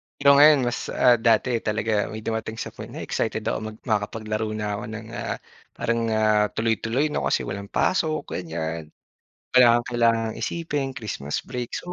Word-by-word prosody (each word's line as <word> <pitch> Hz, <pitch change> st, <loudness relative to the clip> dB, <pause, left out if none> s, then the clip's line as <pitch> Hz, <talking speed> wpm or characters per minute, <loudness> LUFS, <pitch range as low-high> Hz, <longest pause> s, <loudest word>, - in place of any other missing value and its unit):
Pero 140 Hz, -, +3 dB
ngayon 150 Hz, 0 st, +8 dB
mas 120 Hz, -, -1 dB
ah, 120 Hz, -2 st, +4 dB
dati 115 Hz, +2 st, +4 dB, 0.2 s
talaga. 110 Hz, +1 st, 0 dB, 0.2 s
May 110 Hz, 0 st, -7 dB
dumating 110 Hz, 0 st, -3 dB
sa -, -, -5 dB
point -, -, -9 dB
na -, -, -7 dB
excited -, -, -2 dB
ako -, -, -1 dB
mag 110 Hz, 0 st, -9 dB
makakapaglaro 110 Hz, -1 st, -2 dB
na 105 Hz, -1 st, -2 dB
ko -, -, -6 dB
ng 110 Hz, 0 st, -7 dB
ah, 120 Hz, -, -3 dB, 0.4 s
parang 115 Hz, 0 st, 0 dB
ah, 110 Hz, -1 st, +3 dB
tuloy-tuloy 115 Hz, +6 st, 0 dB
no -, -, -1 dB
kasi -, -, +1 dB
walang 100 Hz, +1 st, -5 dB
pasok 155 Hz, -, +1 dB
ganyan. 80 Hz, -2 st, -4 dB, 0.7 s
Wala 125 Hz, -1 st, +7 dB
kang 120 Hz, -, -2 dB
kailangang 115 Hz, -2 st, +2 dB
isipin, 145 Hz, -6 st, -2 dB
Christmas 100 Hz, -, -4 dB
break, 125 Hz, -2 st, -4 dB
so 180 Hz, -, -6 dB
110 Hz, 170 wpm, -24 LUFS, 105-125 Hz, 0.7 s, ngayon